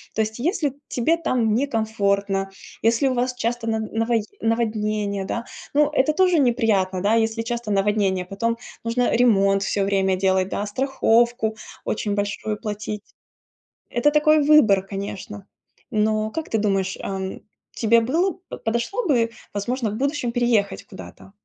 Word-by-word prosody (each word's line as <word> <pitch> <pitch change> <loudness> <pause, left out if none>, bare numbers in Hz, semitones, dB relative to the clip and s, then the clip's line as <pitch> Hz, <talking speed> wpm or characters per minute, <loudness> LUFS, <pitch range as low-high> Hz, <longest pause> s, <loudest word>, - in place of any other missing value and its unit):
То 220 - +2
есть, 220 +2 -3
если 295 -1 0
тебе 285 +7 +1
там 240 -9 +1
не 270 +5 +1
комфортно, 200 -4 0 0.4
если 230 +4 +3
у - - 0
вас 250 0 -1
часто 240 -1 -2
на 220 -1 0
навое 225 +1 0 0.2
наводнения, 215 -3 -1
да. 235 +4 -3 0.3
Ну, 295 0 +4
это 270 +3 +4
тоже 360 -1 +3
неприятно, 220 -8 +2
да, 210 - +3
если 225 +1 -1
часто 235 -1 -4
наводнение. 195 -2 +1
Потом 230 +5 -2 0.3
нужно 235 +1 +1
ремонт 195 -5 +4
все 200 0 0
время 195 -1 +1
делать, 190 0 +1
да, 205 - -2
страховку 235 -1 +1 0.3
очень 205 -1 -1
большую 205 +1 -2
платить. 210 -1 -5 0.9
Это 240 +5 +2
такой 300 0 +4
выбор, 235 -11 +5
конечно. 200 0 -6 0.4
Но 215 0 +1
как 320 +7 -5
ты 220 - +1
думаешь, 195 -2 0
ам, 190 -1 -4 0.3
тебе 230 0 +3
было 330 +10 0
б - - -5
подошло 235 - -1
бы, 235 -6 +2 0.2
возможно, 230 +3 -2
в 205 - -5
будущем 275 0 -1
переехать 235 -4 +1
куда-то? 190 -1 -12
220 Hz, 150 wpm, -23 LUFS, 200-245 Hz, 0.9 s, выбор